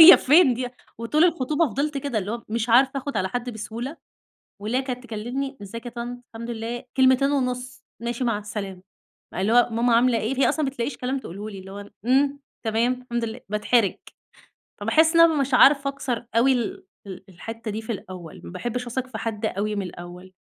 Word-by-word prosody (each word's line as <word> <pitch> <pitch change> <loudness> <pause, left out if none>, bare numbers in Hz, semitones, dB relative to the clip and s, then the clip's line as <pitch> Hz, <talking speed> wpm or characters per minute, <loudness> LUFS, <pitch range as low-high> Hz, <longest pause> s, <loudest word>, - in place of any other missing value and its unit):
هي 330 +3 +12
فين 290 -2 +5
دي؟ 250 +1 -3 0.3
وطول 300 +8 +3
الخطوبة 310 -1 +2
فضلت 280 +5 -1
كده، 275 -5 -2
اللي 200 0 -3
هو 235 0 -5
مش 230 +1 -1
عارفة 255 +4 +6
آخد 280 +1 -3
على 190 - +1
حد 245 +3 -3
بسهولة، 235 +7 -6 0.6
واللي 215 +5 -1
هي - - +2
كانت 255 -2 -5
تكلمني 245 +4 -4
"ازيك 230 +4 -8
يا 240 - -5
طنط؟ 240 +1 -6
الحمد 230 +1 -6
لله." 235 +2 -4
كلمتين 260 +1 +5
ونص 250 -2 -2 0.2
"ماشي، 235 +2 -3
مع 230 -4 +1
السلامة." 205 -3 -6 0.5
اللي 195 +4 +1
هو 245 0 +6
"ماما 235 +1 +3
عاملة 240 0 +4
إيه؟" 225 +4 -2
هي - - +5
أصلًا 310 - 0
ما 270 - -1
بتلاقيش 250 +1 -3
كلام 260 +2 -2
تقول 195 -6 -9
له 210 +2 -5
لي، 200 -2 -8
اللي 190 +1 -11
هو 205 +1 -8 0.2
"إمم، 275 +3 +3 0.2
تمام، 230 +2 +2
الحمد 240 -2 -2
لله." 225 +2 -6
باتحرج. 210 0 +2 0.9
فباحس 320 +1 +4
إن 335 - +6
أنا 325 -3 +6
مش 270 -1 0
عارفة 275 +2 +6
أكسر 255 -4 -4
أوي 255 +4 +5
ال 250 - -2 0.2
ال 190 -1 -8
الحتّة 225 +5 -7
دي 215 +2 -4
في 225 - -3
الأوّل، 185 -5 -8
ما - - -8
باحبش 240 +7 -4
أثق 250 +2 -3
في 250 -4 -7
حد 220 -1 -2
أوي 210 +1 -1
من 200 - -1
الأوّل. 180 +1 -9
240 Hz, 205 wpm, -24 LUFS, 215-265 Hz, 0.9 s, هي